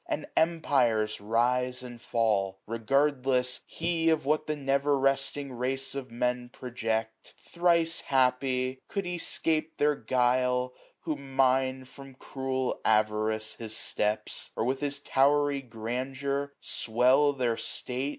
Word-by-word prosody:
And 310 Hz, -4 st, -2 dB
empires 125 Hz, -11 st, +2 dB
rise 125 Hz, +4 st, +1 dB
and 120 Hz, -2 st, -9 dB
fall; 105 Hz, -6 st, 0 dB
regardless 130 Hz, +2 st, +1 dB
he 165 Hz, 0 st, -1 dB
725 160 Hz, -1 st, +5 dB
Of 155 Hz, -, -16 dB
what 155 Hz, +1 st, +1 dB
the 155 Hz, -, -1 dB
never 140 Hz, 0 st, +1 dB
resting 135 Hz, 0 st, 0 dB
race 135 Hz, +2 st, -2 dB
of 140 Hz, -2 st, -5 dB
Men 125 Hz, +1 st, -1 dB
Project: 115 Hz, -3 st, -4 dB
thrice 170 Hz, -1 st, +1 dB
happy! 130 Hz, 0 st, +1 dB
could 200 Hz, -2 st, -3 dB
he 175 Hz, -1 st, -3 dB
'scape 160 Hz, -1 st, 0 dB
their 150 Hz, +1 st, +3 dB
guile. 125 Hz, 0 st, +1 dB, 0.3 s
Who 155 Hz, -3 st, -3 dB
mine, 130 Hz, -1 st, +1 dB
from 135 Hz, +1 st, -13 dB
cruel 130 Hz, -1 st, -3 dB
avarice, 110 Hz, 0 st, +1 dB
his 110 Hz, -1 st, -4 dB
steps; 105 Hz, +1 st, -2 dB
Or 110 Hz, -, -1 dB
with 130 Hz, +2 st, 0 dB
his 145 Hz, -1 st, -1 dB
towery 145 Hz, 0 st, +2 dB
grandeur 130 Hz, +4 st, -3 dB
swell 130 Hz, +6 st, +3 dB
their 125 Hz, -4 st, 0 dB
state. 130 Hz, +4 st, -2 dB
130 Hz, 130 wpm, -29 LUFS, 120-140 Hz, 0.3 s, 725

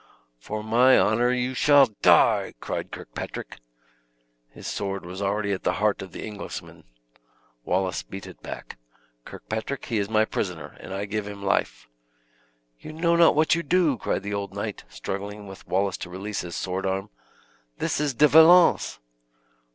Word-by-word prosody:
"For 105 Hz, -, -5 dB
my 120 Hz, +4 st, +5 dB
honor 120 Hz, +3 st, +3 dB
you 125 Hz, +1 st, -1 dB
shall 145 Hz, +1 st, +6 dB, 0.2 s
die!" -, -, +4 dB
cried -, -, -4 dB
Kirkpatrick. -, -, -7 dB, 0.9 s
His -, -, -13 dB
sword 100 Hz, -2 st, -3 dB
was 90 Hz, +3 st, -7 dB
already 100 Hz, +1 st, -1 dB
at 95 Hz, -, -2 dB
the -, -, 0 dB
heart 105 Hz, -1 st, +1 dB
of 95 Hz, -, -8 dB
the -, -, -7 dB
Englishman. 105 Hz, -2 st, -8 dB, 0.8 s
Wallace 95 Hz, 0 st, 0 dB
beat 95 Hz, -1 st, -9 dB
it -, -, -12 dB
back. -, -, -8 dB, 0.5 s
"Kirkpatrick, 110 Hz, +5 st, -5 dB
he 115 Hz, -3 st, -1 dB
is 100 Hz, 0 st, -2 dB
my 110 Hz, 0 st, +3 dB
prisoner, 90 Hz, -7 st, -4 dB
and -, -, -10 dB
I 100 Hz, +1 st, -3 dB
give 105 Hz, 0 st, -3 dB
him 100 Hz, -1 st, -8 dB
life." 100 Hz, -, -1 dB, 0.9 s
"You 155 Hz, -, -9 dB
know 170 Hz, +1 st, +2 dB
not 170 Hz, -2 st, +5 dB
what 155 Hz, 0 st, +3 dB
you 170 Hz, -, +1 dB
do," 170 Hz, -2 st, +2 dB
cried 110 Hz, -, -2 dB
the 100 Hz, 0 st, -4 dB
old 100 Hz, -1 st, -4 dB
knight, 100 Hz, 0 st, -5 dB
struggling 100 Hz, +11 st, -6 dB
with 95 Hz, -1 st, -12 dB
Wallace 95 Hz, 0 st, 0 dB
to 90 Hz, -, -7 dB
release 95 Hz, +3 st, -4 dB
his 85 Hz, -1 st, -7 dB
sword 95 Hz, +1 st, -2 dB
arm. 95 Hz, +1 st, -3 dB, 0.7 s
"This -, -, -1 dB
is 145 Hz, -4 st, -1 dB
De 150 Hz, +5 st, +6 dB
Valence!" 165 Hz, +4 st, +6 dB
105 Hz, 165 wpm, -25 LUFS, 95-130 Hz, 0.9 s, shall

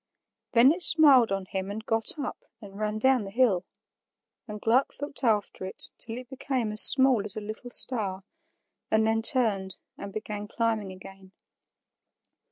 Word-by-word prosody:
Then 245 Hz, +3 st, +5 dB
it 350 Hz, +3 st, -4 dB
smiled 280 Hz, -, +5 dB
on 195 Hz, -1 st, -3 dB
him 190 Hz, 0 st, -6 dB
and 220 Hz, +2 st, -8 dB
got 225 Hz, +6 st, 0 dB
up 280 Hz, -4 st, -7 dB, 0.2 s
and 200 Hz, -2 st, -13 dB
ran 215 Hz, 0 st, -3 dB
down 260 Hz, 0 st, +1 dB
the 195 Hz, -, -9 dB
hill; 205 Hz, -5 st, 0 dB, 0.8 s
and 210 Hz, -1 st, -8 dB
Gluck 240 Hz, +6 st, 0 dB
looked 285 Hz, -1 st, -4 dB
after 210 Hz, -5 st, -2 dB
it 190 Hz, -, -7 dB
till 225 Hz, +1 st, -5 dB
it 250 Hz, 0 st, -10 dB
became 260 Hz, -3 st, -4 dB
as 215 Hz, -, +7 dB
small 260 Hz, -5 st, +7 dB
as 205 Hz, -2 st, -3 dB
a -, -, -2 dB
little 215 Hz, +3 st, -9 dB
star, 205 Hz, -7 st, -1 dB, 0.7 s
and 220 Hz, 0 st, +1 dB
then 225 Hz, 0 st, -1 dB
turned 215 Hz, -8 st, +2 dB, 0.2 s
and 200 Hz, -, -9 dB
began 210 Hz, 0 st, -7 dB
climbing 220 Hz, -3 st, -3 dB
again. 190 Hz, +1 st, -15 dB
220 Hz, 165 wpm, -25 LUFS, 200-250 Hz, 0.8 s, as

